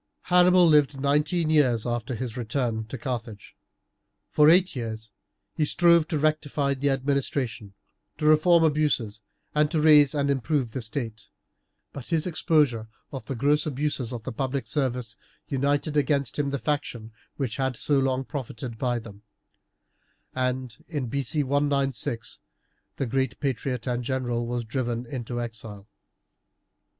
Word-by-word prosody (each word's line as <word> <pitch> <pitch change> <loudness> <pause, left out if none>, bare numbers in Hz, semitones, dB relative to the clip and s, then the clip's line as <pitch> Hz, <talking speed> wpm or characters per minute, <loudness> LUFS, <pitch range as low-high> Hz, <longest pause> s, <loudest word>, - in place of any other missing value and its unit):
Hannibal 180 0 +6
lived 145 -3 +4
nineteen 150 +4 +1
years 130 -8 +3
after 120 0 -2
his 120 0 -5
return 115 -2 -2
to 120 +5 -7
Carthage. 115 -4 -6 0.8
For 150 0 +6
eight 180 +1 +4
years 110 -3 -5 0.4
he 155 - 0
strove 170 +1 +4
to 165 - -1
rectify 150 -2 0
the 140 +1 0
administration, 135 -6 -2 0.4
to 150 - -3
reform 165 +2 +5
abuses, 145 -9 +1 0.3
and 150 0 +3
to 155 - 0
raise 150 -2 +6
and 140 -1 +1
improve 135 -2 0
the 130 - -4
state; 110 -1 -5 0.6
but 135 -4 -8
his 165 -2 0
exposure 150 -9 +1 0.2
of 130 -6 -7
the 135 - -3
gross 145 +5 +2
abuses 140 -4 -2
of 120 -3 -6
the 130 - -5
public 130 +1 -2
service 125 -3 -2 0.3
united 145 +2 0
against 140 -2 +1
him 140 -1 +1
the 140 - -1
faction 125 -6 -3 0.2
which 130 -6 -3
had 130 -3 -1
so 145 -2 +1
long 135 0 0
profited 125 -4 -6
by 125 -2 0
them, 105 -3 -10 1.1
and, 125 -2 -3
in 145 -7 -3
B. 140 +4 -1
C. 145 +3 -1
196, 135 -5 -1 0.5
the 135 - -2
great 130 +2 -1
patriot 125 -3 -2
and 125 -1 -1
general 120 -2 -2
was 120 0 -2
driven 120 0 -2
into 120 -1 -5
exile. 110 -4 -7
135 Hz, 145 wpm, -26 LUFS, 120-150 Hz, 1.1 s, Hannibal